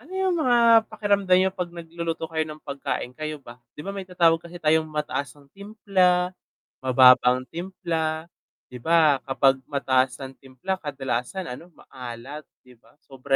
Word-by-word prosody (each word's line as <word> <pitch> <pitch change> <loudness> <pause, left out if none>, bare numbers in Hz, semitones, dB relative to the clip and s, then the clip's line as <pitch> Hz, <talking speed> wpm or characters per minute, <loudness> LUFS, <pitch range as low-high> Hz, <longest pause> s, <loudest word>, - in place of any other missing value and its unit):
ano 335 - -16
yung 380 -1 +1
mga 235 -4 +5
pakiramdam 200 -3 +2
niyo 190 0 +2
'pag 180 -3 -4
nagluluto 170 -1 -5
kayo 160 -1 -2
ng 155 0 -10
pagkain, 140 -3 -4
kayo 155 +1 -5
ba? 120 -3 -14 0.2
Di 150 - -7
ba 195 - -4
may 195 - -5
tinatawag 170 -3 +3
kasi 170 +1 -10
tayong 155 -1 +2
mataas 150 -3 -3
ang 140 - -20
timpla, 190 -3 +1 0.5
mababa 130 0 +6
ang 130 - -8
timpla. 165 -3 -3 0.4
Di 125 - -8
ba 155 -1 +4
kapag 135 0 +2
mataas 130 -3 +1
ang 135 0 -8
timpla 135 +9 -5
kadalasan 135 +4 -4
ano 165 +8 -9
maalat 130 +4 -9 0.2
di 125 - -19
ba 115 - -26
sobra 135 +1 -2
160 Hz, 160 wpm, -24 LUFS, 135-185 Hz, 0.5 s, mababa